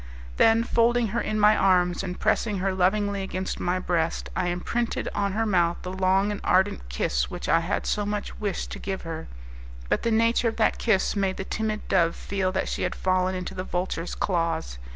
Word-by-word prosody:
Then 225 0 +5
folding 235 -1 +2
her 235 +4 -1
in 215 0 -2
my 210 +1 +6
arms, 180 -3 +3
and 180 -2 -5
pressing 215 -1 +1
her 190 +1 0
lovingly 200 +2 +1
against 190 -1 -4
my 180 +1 0
breast, 170 -3 -1
I 180 - 0
imprinted 220 +7 -2
on 200 -1 -1
her 225 +2 0
mouth 175 -5 +2
the 180 - -4
long 190 +2 +2
and 205 - -5
ardent 190 - +1
kiss - - -1
which - - -6
I - - +4
had - - -2
so 210 - 0
much 205 0 -4
wished 205 -3 -3
to - - -6
give 195 -1 -4
her; 165 -1 -6 0.6
but - - +1
the 230 - 0
nature 230 +1 +3
of 225 - -1
that 220 - +1
kiss 215 -4 +2
made 195 -2 0
the - - -3
timid 215 0 -3
dove 170 -3 +2
feel 195 -2 -2
that 190 - -1
she - - -3
had - - -1
fallen 185 0 +1
into 185 +1 -5
the 185 -1 -4
vulture's 180 -2 -3
claws. 165 - -1
190 Hz, 205 wpm, -26 LUFS, 180-210 Hz, 0.6 s, my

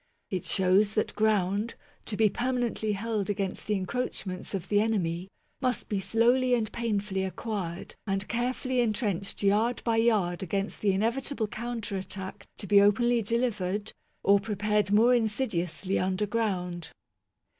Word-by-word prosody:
It 185 -3 -2
shows 195 +3 +3
that 215 - 0
ground, 210 0 +1 0.3
to 210 - -3
be 220 - +5
permanently 240 -2 -1
held 210 -1 -2
against 200 -2 -2
the 210 - +1
encroachments 190 -2 -3
of 190 -1 -4
the 205 0 +3
enemy, 185 -5 -1 0.3
must 255 -3 -1
be 205 - 0
slowly 240 +5 +3
and 220 -3 -1
painfully 205 -4 -1
acquired 190 -3 -4
and 195 0 -1
carefully 250 +1 0
entrenched 205 -4 -1
yard 215 +5 +2
by 230 -1 +2
yard 210 -7 +2
against 195 +2 -2
the 205 - +3
inevitable 230 +4 0
counter 225 -2 -4
attack 190 0 -7
to - - -7
be 200 0 +6
openly 235 +4 +4
delivered, 210 -3 -1 0.3
or 200 0 +5
prepared 210 -1 0
more 225 +4 +6
insidiously 195 - 0
underground. 185 -3 -1
210 Hz, 135 wpm, -28 LUFS, 190-230 Hz, 0.3 s, be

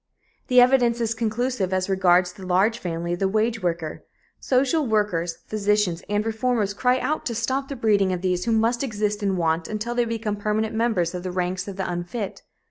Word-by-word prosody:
The 250 -2 +5
evidence 245 -2 +4
is 230 -1 0
conclusive 230 -2 -1
as 185 0 0
regards 180 -2 +3
the 190 - -12
large 200 +6 +2
family 170 -3 -3
of 175 - -4
the 195 - +2
wage 220 +3 0
worker. 170 -3 -3 0.4
Social 275 +3 +1
workers, 180 -6 0
physicians 210 -4 0
and 210 +1 0
reformers 220 -2 0
cry 250 +4 +2
out 305 +4 -1
to 235 - -3
stop 260 +4 -1
the 280 - -4
breeding 205 -5 +2
of 180 -1 -2
these, 180 -1 0
who 235 - 0
must 230 +2 +2
exist 210 -4 -2
in 195 -2 0
want 165 -1 0
until 215 +3 -3
they 240 0 +1
become 225 -2 -3
permanent 215 +2 -1
members 220 -7 0
of 180 - -4
the 185 - -4
ranks 180 +1 -2
of 200 - -6
the 190 -1 -3
unfit. 180 +4 -4
210 Hz, 200 wpm, -24 LUFS, 185-235 Hz, 0.4 s, The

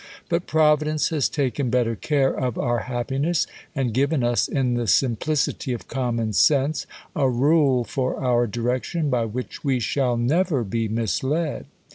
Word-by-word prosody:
But 170 0 -1
Providence 155 -1 +2
has 155 -5 +1
taken 135 -2 -1
better 120 -2 +1
care 140 +2 +1
of 125 -3 -2
our 120 -1 0
happiness, 135 +7 -1 0.3
and 130 -5 -1
given 140 +2 +1
us, 120 0 +2
in 130 -3 0
the 120 -1 -1
simplicity 130 - +1
of 120 - -7
com 125 -3 -2
mon 110 -2 -1
sense, 145 +6 +2 0.3
a 135 - +2
rule 135 0 +3
for 130 +3 -2
our 120 -2 +2
direction, 125 - -2
by 120 -2 +1
which 120 +3 -6
we 135 -3 +1
shall 125 0 0
never 145 +3 +1
be 115 +2 -2
misled. 130 - -1
130 Hz, 155 wpm, -23 LUFS, 120-145 Hz, 0.3 s, rule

